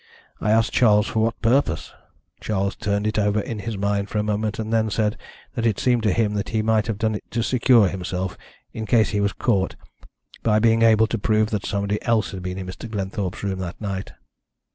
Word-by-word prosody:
I 105 - -1
asked 110 +1 +3
Charles 105 -3 +4
for 110 - -2
what 115 +1 0
purpose? 130 +5 +1 0.5
Charles 100 -1 -1
turned 100 0 -1
it 110 0 0
over 105 +1 +2
in 105 +1 -4
his 105 +1 -4
mind 100 0 -1
for - - -3
a 105 - +1
moment, 105 0 -1
and 110 0 -3
then 110 -1 +2
said 105 0 0 0.4
that 115 - -3
it 110 - +1
seemed 125 -2 +2
to 105 -2 +2
him 105 +1 +1
that 100 -1 -2
he 110 -1 0
might 110 0 +2
have 110 -3 -2
done 110 0 0
it 105 - -5
to 115 0 -1
secure 120 -3 +4
himself, 95 0 -3 0.4
in 110 -1 -5
case 110 0 +3
he 105 -1 0
was 100 0 +1
caught, 100 -6 0 0.7
by 105 -2 +2
being 115 +1 +3
able 110 -1 +5
to 115 0 -3
prove 110 +1 +1
that 105 -3 -2
somebody 100 +1 -1
else 115 -2 +1
had 95 -2 -6
been 90 +1 -4
in 95 - -5
Mr. 95 +5 -8
Glenthorpe's 100 -2 -4
room 95 -2 -2
that 90 -2 -5
night. 100 -3 -4
105 Hz, 220 wpm, -23 LUFS, 100-110 Hz, 0.7 s, able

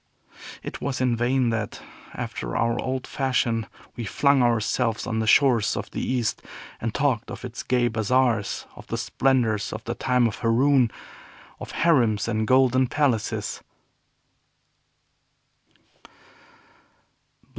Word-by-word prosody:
It - - -7
was 135 -2 -2
in 125 -2 +2
vain 120 +1 +1
that, 110 -2 -3 0.4
after - - -4
our 115 +1 +1
old 130 -1 -3
fashion, 120 -4 0 0.3
we 120 - -5
flung 140 +6 +2
ourselves 115 0 +1
on 110 -2 -2
the 110 - -1
shores 120 -3 +4
of - - -5
the - - -4
East, 125 -3 -1 0.4
and 115 - -2
talked 130 -3 0
of - - -7
its 120 -1 -6
gay 125 -1 +1
bazaars, 115 -2 0
of - - -13
the - - -3
splendors 120 -6 +1
of - - -6
the 120 - -3
time 125 0 +1
of 115 - -1
Haroun, 125 +2 +3 0.7
of - - -8
harems 120 -12 +2
and 110 -1 -1
golden 130 0 +4
palaces. 125 -6 -1
120 Hz, 125 wpm, -24 LUFS, 115-130 Hz, 0.7 s, shores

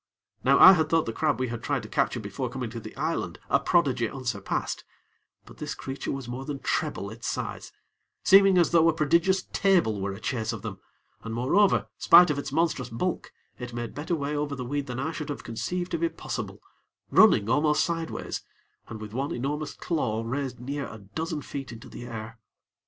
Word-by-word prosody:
Now 135 +2 +5
I 190 - +11
had 160 -3 +1
thought 165 -1 +3
the 115 - -3
crab 150 +2 0
we 130 -1 -1
had 115 -1 -5
tried 135 -1 -1
to - - -7
capture 120 - 0
before 115 +5 -4
coming 125 -2 -5
to 115 - -5
the 110 -1 -10
island, 160 +4 -2
a - - +5
prodigy 130 - +2
unsurpassed; 120 -7 -3 0.6
but - - -15
this - - -4
creature 135 +1 -5
was 135 -3 -5
more 125 +2 -5
than 145 0 -4
treble - - -2
its - - -7
size, - - -4 0.5
seeming 195 -1 +7
as 170 -3 +4
though 165 -1 +5
a - - +2
prodigious 170 +5 +2
table 170 - +3
were 100 +1 -2
a 100 - -7
chase 115 -4 -2
of 110 - -7
them, 100 -4 -6 0.4
and 115 0 -5
moreover, 180 - +3
spite 175 -3 +8
of 145 - -1
its 140 - -5
monstrous 150 -5 0
bulk, 150 +11 -3 0.3
it 125 -1 -6
made 120 -1 -4
better 155 +4 -2
way 145 -1 -2
over 145 -1 -2
the 125 -2 -5
weed 145 +2 -2
than 125 0 -4
I 155 +4 -1
should 155 -2 -6
have 145 - -5
conceived 175 +10 -3
to 170 - -1
be 165 0 +1
possible - - -6 0.5
running 100 - +6
almost 150 +4 +3
sideways, 165 -1 -3 0.5
and 110 - -7
with 105 -1 -8
one 135 +4 -2
enormous 145 +4 -3
claw 115 -10 -1
raised 130 0 -3
near 140 +3 -4
a 110 - -9
dozen 150 - -5
feet 135 -1 -6
into 115 -1 -10
the 120 - -8
air. 115 0 -7
135 Hz, 200 wpm, -27 LUFS, 115-160 Hz, 0.6 s, I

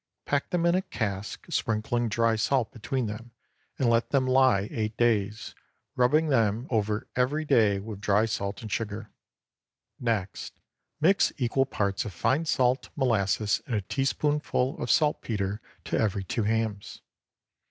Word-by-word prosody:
Pack 145 0 0
them 175 -1 0
in 170 - +4
a 185 - +2
cask, 105 - -4
sprinkling 115 +1 0
dry 115 +1 +2
salt 120 +2 +1
between 120 +2 -3
them, 110 +3 -6 0.5
and 130 - +1
let 115 0 +2
them 135 -2 +2
lie 130 -6 +3
eight 110 -1 -3
days, 105 -3 0 0.4
rubbing 150 +6 +3
them 115 -3 +2
over 105 0 0
every 145 +5 +1
day 110 -8 +4
with 100 0 -8
dry 105 +2 +3
salt 100 -1 -3
and 110 - -7
sugar. 110 0 -4 0.9
Next 110 -6 -3 0.4
mix 185 +6 +4
equal 135 +1 +1
parts 100 -5 -1
of 105 - -7
fine 130 - +1
salt, 130 -3 +1
molasses, 110 -6 +1
and 120 - -1
a 105 - 0
teaspoonful 135 +3 -1
of 120 - -3
saltpetre 105 -9 +1 0.2
to - - -1
every 100 -3 0
two 105 +4 -2
hams. 110 -2 -2
115 Hz, 145 wpm, -27 LUFS, 105-130 Hz, 0.9 s, in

